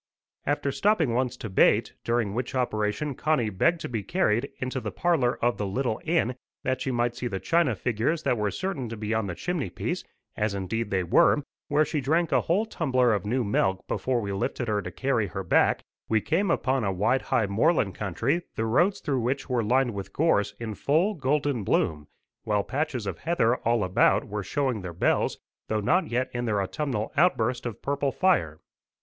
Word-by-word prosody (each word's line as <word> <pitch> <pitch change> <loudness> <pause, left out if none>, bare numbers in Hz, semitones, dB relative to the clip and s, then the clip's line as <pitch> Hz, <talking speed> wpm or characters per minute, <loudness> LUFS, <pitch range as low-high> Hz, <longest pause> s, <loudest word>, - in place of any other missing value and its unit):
After 145 -1 0
stopping 175 - +2
once 125 +1 0
to 115 - -6
bait, 95 - +3
during 115 -4 0
which 125 +3 -3
operation 120 +3 -1
Connie 130 -6 0
begged 165 - +2
to - - -3
be 115 -3 -3
carried 120 - +1
into 130 0 -3
the - - -4
parlour 160 -8 +1
of 120 - +2
the 105 - -2
little 120 +3 -1
inn 155 -7 +1 0.3
that 130 0 -1
she - - -1
might 120 -1 0
see 125 - -3
the 95 -5 -3
china 165 - +2
figures 125 - -1
that - - +2
were 105 -2 0
certain 160 - -3
to 115 - -6
be 105 +1 -2
on 110 -2 0
the 90 - -4
chimney 170 - -2
piece, - - -3 0.3
as 105 -1 -1
indeed 105 +3 -2
they 95 -2 0
were, 115 - +4 0.2
where 150 +2 +3
she 150 -2 -2
drank 160 +6 +1
a - - +4
whole 195 +7 +1
tumbler 130 - +1
of 105 -1 -2
new 125 +3 +1
milk 95 -2 0
before 125 -2 0
we 100 -2 -3
lifted 120 +5 -2
her 105 -1 0
to - - -6
carry 130 -6 0
her 95 - -5
back, 90 - +3 0.3
we 110 - +3
came 170 - 0
upon 130 -6 +1
a 100 - +1
wide 105 +8 +1
high 115 - +1
moorland 105 - +2
country 115 - -1
the 110 - -1
roads 175 - +2
through 135 -3 0
which 130 +4 -1
were 120 -2 +1
lined 125 +2 +2
with 100 -1 -6
gorse 145 -11 +2
in 115 -2 -4
full 160 - +1
golden 145 - 0
bloom, 75 -5 0 0.4
while 105 -1 +1
patches 130 -3 -2
of - - -4
heather 140 -7 +1
all 115 -2 +1
about 95 +1 +3
were 105 0 -3
showing 130 -1 -1
their 90 -2 -6
bells, 85 - +1 0.3
though 110 - 0
not 180 - +2
yet 125 +2 -1
in 120 0 -2
their 105 -3 +1
autumnal 110 - -2
outburst 125 -7 +2
of 115 - -8
purple 140 0 0
fire. 110 - +1
120 Hz, 200 wpm, -26 LUFS, 105-145 Hz, 0.4 s, were